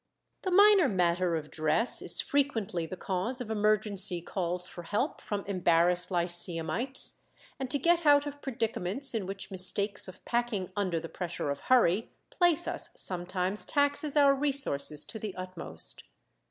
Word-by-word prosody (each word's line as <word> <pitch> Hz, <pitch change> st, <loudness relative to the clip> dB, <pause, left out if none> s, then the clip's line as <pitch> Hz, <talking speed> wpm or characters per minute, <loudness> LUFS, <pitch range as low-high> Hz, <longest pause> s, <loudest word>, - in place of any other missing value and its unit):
"] -, -, -50 dB
The 375 Hz, -, -3 dB
minor 395 Hz, -4 st, +5 dB
matter 180 Hz, -2 st, 0 dB
of 155 Hz, -2 st, -6 dB
dress 155 Hz, +9 st, 0 dB
is -, -, 0 dB
frequently 225 Hz, -12 st, -2 dB
the 185 Hz, -, -8 dB
cause 195 Hz, +8 st, -3 dB
of 235 Hz, -3 st, -6 dB
emergency 210 Hz, -3 st, 0 dB
calls 180 Hz, 0 st, -3 dB
for 175 Hz, -, -10 dB
help 205 Hz, -, -3 dB
from 205 Hz, -1 st, -5 dB
embarrassed 175 Hz, -2 st, +1 dB
lyceumites, 175 Hz, +7 st, +4 dB, 0.4 s
and 265 Hz, -1 st, -4 dB
to 285 Hz, -, +2 dB
get 340 Hz, +4 st, +2 dB
out 290 Hz, -1 st, +4 dB
of 290 Hz, 0 st, -8 dB
predicaments 230 Hz, 0 st, -1 dB
in 215 Hz, -5 st, -3 dB
which 195 Hz, 0 st, -7 dB
mistakes 200 Hz, +2 st, +2 dB
of 185 Hz, -, -13 dB
packing 235 Hz, -6 st, -2 dB
under 185 Hz, -5 st, -1 dB
the 165 Hz, -, -8 dB
pressure 170 Hz, -4 st, -5 dB
of 140 Hz, -, -5 dB
hurry 225 Hz, -5 st, +2 dB, 0.2 s
place 345 Hz, -2 st, +2 dB
us -, -, -3 dB
sometimes 185 Hz, +2 st, 0 dB
taxes 285 Hz, +1 st, 0 dB
our 280 Hz, -1 st, +5 dB
resources 265 Hz, -, 0 dB
to 220 Hz, -, -7 dB
the 210 Hz, -2 st, -6 dB
uttermost. 185 Hz, -, -3 dB
200 Hz, 155 wpm, -28 LUFS, 175-265 Hz, 0.4 s, minor